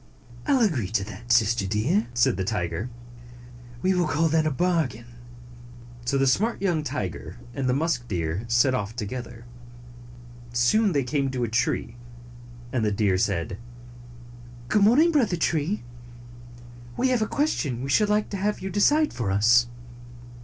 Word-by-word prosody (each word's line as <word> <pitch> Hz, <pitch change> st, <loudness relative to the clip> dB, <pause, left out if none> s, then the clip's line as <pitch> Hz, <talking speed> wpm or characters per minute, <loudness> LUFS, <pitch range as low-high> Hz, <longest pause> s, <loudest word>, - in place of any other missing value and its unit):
" 120 Hz, 0 st, -18 dB
I -, -, +3 dB
'll 265 Hz, -, +3 dB
agree 140 Hz, -, 0 dB
to 100 Hz, 0 st, -1 dB
that, 110 Hz, +4 st, -8 dB
Sister 115 Hz, -3 st, +3 dB
Deer," 120 Hz, -, +1 dB
said 120 Hz, -5 st, +3 dB
the 95 Hz, -, -2 dB
tiger. 95 Hz, +1 st, -3 dB, 0.9 s
"We 190 Hz, -, +3 dB
will 180 Hz, -3 st, +1 dB
call 155 Hz, +2 st, +1 dB
that 155 Hz, 0 st, +2 dB
a -, -, +3 dB
bargain." 155 Hz, -7 st, -1 dB, 1.0 s
So 140 Hz, +3 st, +1 dB
the 135 Hz, -, +2 dB
smart 205 Hz, -, +1 dB
young 175 Hz, -5 st, 0 dB
tiger 150 Hz, -, -5 dB, 0.2 s
and 130 Hz, -1 st, -2 dB
the 125 Hz, -, +2 dB
musk 140 Hz, -5 st, -1 dB
deer 85 Hz, +2 st, -2 dB
set 120 Hz, +3 st, +3 dB
off 110 Hz, -3 st, -3 dB
together. 120 Hz, +1 st, -6 dB, 1.1 s
Soon 175 Hz, -, +3 dB
they 140 Hz, -2 st, +1 dB
came 135 Hz, +1 st, -1 dB
to 130 Hz, -2 st, -2 dB
a -, -, 0 dB
tree, 115 Hz, +1 st, -1 dB, 0.8 s
and 125 Hz, -4 st, 0 dB
the 105 Hz, -, +1 dB
deer 100 Hz, -3 st, +1 dB
said, 95 Hz, -2 st, -1 dB, 1.1 s
"Good 210 Hz, -, +3 dB
morning, 265 Hz, +12 st, +5 dB
Brother 230 Hz, -, +2 dB
Tree. 160 Hz, -, -1 dB, 1.1 s
We 260 Hz, -, +2 dB
have 250 Hz, -3 st, +1 dB
a 215 Hz, -, +1 dB
ques 295 Hz, +6 st, +1 dB
tion 130 Hz, -5 st, -3 dB
we 135 Hz, -, -4 dB
should 210 Hz, +9 st, +3 dB
like 210 Hz, 0 st, +1 dB
to 200 Hz, -, -3 dB
have 205 Hz, +2 st, -1 dB
you 190 Hz, +1 st, -5 dB
decide 295 Hz, -, +3 dB
for 115 Hz, -5 st, -3 dB
us." 115 Hz, +5 st, +4 dB
130 Hz, 165 wpm, -25 LUFS, 115-185 Hz, 1.1 s, morning